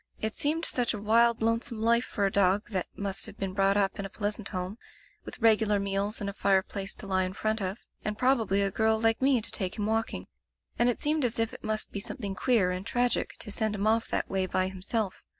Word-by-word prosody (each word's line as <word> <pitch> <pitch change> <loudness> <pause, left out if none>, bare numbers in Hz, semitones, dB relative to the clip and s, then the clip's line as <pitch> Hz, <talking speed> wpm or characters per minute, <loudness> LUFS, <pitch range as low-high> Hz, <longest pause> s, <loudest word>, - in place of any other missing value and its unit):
It 220 0 -2
seemed 315 +3 +1
such 240 -2 +1
a - - -5
wild, 230 +2 +3
lonesome 230 0 0
life 235 +2 +3
for 205 - -1
a 195 - +1
dog 200 +3 +2
that 185 -3 -1
must 200 0 -3
have 215 - -11
been 195 -1 -3
brought 195 +1 +3
up 195 -1 +1
in - - -2
a - - -6
pleasant 205 +1 -3
home, 185 +3 -5 0.5
with - - -8
regular 220 -2 +4
meals 200 +2 -1
and 205 - -3
a 200 - -3
fireplace 195 0 0
to - - -9
lie 190 -1 +1
in 185 0 -3
front 215 +2 -1
of, 190 +3 -4 0.2
and 210 0 -3
probably 225 -6 +2
a 195 - 0
girl 220 +2 +2
like 225 +1 +2
me 265 -3 +4
to - - -5
take 185 -3 -3
him 205 - -1
walking. 225 +1 -1 0.5
And 240 +1 +4
it 245 - -1
seemed 300 0 +1
as 240 -2 0
if 225 -1 0
it - - -10
must 215 0 -2
be 200 - -3
something 200 -1 -4
queer 195 -2 +2
and 180 +1 -3
tragic 245 +4 0
to 210 - -5
send 215 0 -1
him 200 0 -2
off 225 +1 +2
that - - -1
way 190 -1 0
by 185 +1 +1
himself. 190 +2 -3
210 Hz, 240 wpm, -29 LUFS, 195-225 Hz, 0.5 s, regular